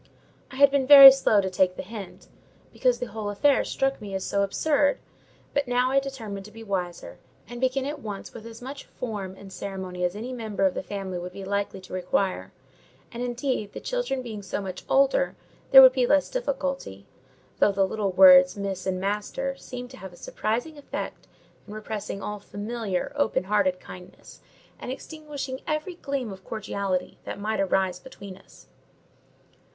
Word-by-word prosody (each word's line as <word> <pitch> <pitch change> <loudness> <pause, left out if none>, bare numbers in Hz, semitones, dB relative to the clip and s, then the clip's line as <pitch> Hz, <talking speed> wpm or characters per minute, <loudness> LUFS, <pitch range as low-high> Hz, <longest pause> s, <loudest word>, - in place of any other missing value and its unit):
I - - -11
had 280 +1 +6
been 275 -2 +1
very 275 -1 +13
slow 240 -6 +3
to 190 - -2
take 185 0 +2
the - - -6
hint, 200 -1 -9 0.5
because 250 -2 +2
the 245 - -3
whole 215 -2 -5
affair 275 +8 +3
struck 270 -2 -1
me 200 -2 -6
as 190 - -3
so - - -3
very 200 - +3
absurd; 285 +7 +1 0.6
but 285 -2 0
now 250 +1 +1
I 275 - +4
determined 225 -8 -6
to 210 - -12
be 225 +1 -11
wiser, 180 -4 -4 0.3
and 240 +1 -8
begin 260 +1 +1
at 295 +1 -4
once 205 -4 -7
with 230 -1 -9
as 230 +1 -11
much 275 +2 -8
form 205 -6 -6
and 195 0 -12
ceremony 190 -2 -5
as 180 +1 0
any 240 +5 -5
member 220 -5 -2
of 190 - +2
the - - -3
family 190 -1 -5
would 180 +1 -7
be 195 0 -8
likely 200 0 -2
to 185 - -12
require: 185 - -1 0.6
and, 235 - -6
indeed, 245 -3 -2
the - - -6
children - - -2
being 220 -4 -6
so 195 0 -4
much 190 -2 -6
older, 275 - +3 0.3
there 265 0 +11
would 260 -1 +8
be 255 -2 +2
less 290 +1 +3
difficulty; 275 - -3 0.5
though 205 - +5
the 195 0 +2
little 200 0 -2
words 275 +3 +7
Miss 195 -2 -4
and 185 -1 -1
Master 210 +8 -2
seemed 250 -2 -8
to 260 - -11
have 190 -5 -10
a - - -15
surprising 245 - -3
effect 285 - -6 0.4
in 210 - -9
repressing 210 -2 -5
all 210 0 -4
familiar, 205 -2 -4
open 285 -9 +1
hearted 190 -2 +1
kindness, 180 0 -13 0.4
and - - -6
extinguishing 285 -2 -7
every 310 +4 -2
gleam 275 - -4
of 190 0 -13
cordiality 200 -4 -3
that - - -6
might 215 +2 -2
arise 190 -2 +1
between 200 -3 -11
us. 195 - -19
215 Hz, 185 wpm, -26 LUFS, 195-270 Hz, 0.6 s, very